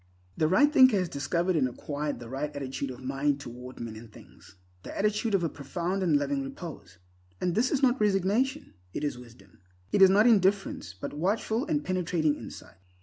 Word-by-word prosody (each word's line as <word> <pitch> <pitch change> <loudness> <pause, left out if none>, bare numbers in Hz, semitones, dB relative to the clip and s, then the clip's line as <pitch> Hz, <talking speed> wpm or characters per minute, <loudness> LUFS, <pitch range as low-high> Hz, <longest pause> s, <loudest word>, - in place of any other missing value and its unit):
The 155 - +2
right 290 - +4
thinker 255 -6 +7
has 185 -2 0
discovered 170 +6 -1
and 135 -5 +2
acquired 145 +2 -4
the 120 - -9
right 135 +4 -3
attitude 135 0 -4
of 130 0 -9
mind 135 +2 0
toward 125 -1 -9
men 115 -2 -6
and 110 0 -12
things—the 90 -2 -14
attitude 210 +1 +1
of 185 - +1
a - - +2
profound 170 +7 -3
and 165 -5 +3
loving 140 -1 -1
repose. 135 - -8 0.4
And 180 - 0
this 235 +7 +2
is 280 -2 0
not 255 -2 +3
resignation, 210 +8 +1 0.2
it - - -3
is 145 -4 -2
wisdom. 115 -6 -16 0.3
It - - +2
is 190 - +9
not 205 +3 +5
indifference, 195 - +2
but - - -5
watchful 215 - -1
and 300 -2 -1
penetrating 175 -4 +1
insight. - - -10
155 Hz, 185 wpm, -28 LUFS, 135-200 Hz, 0.4 s, is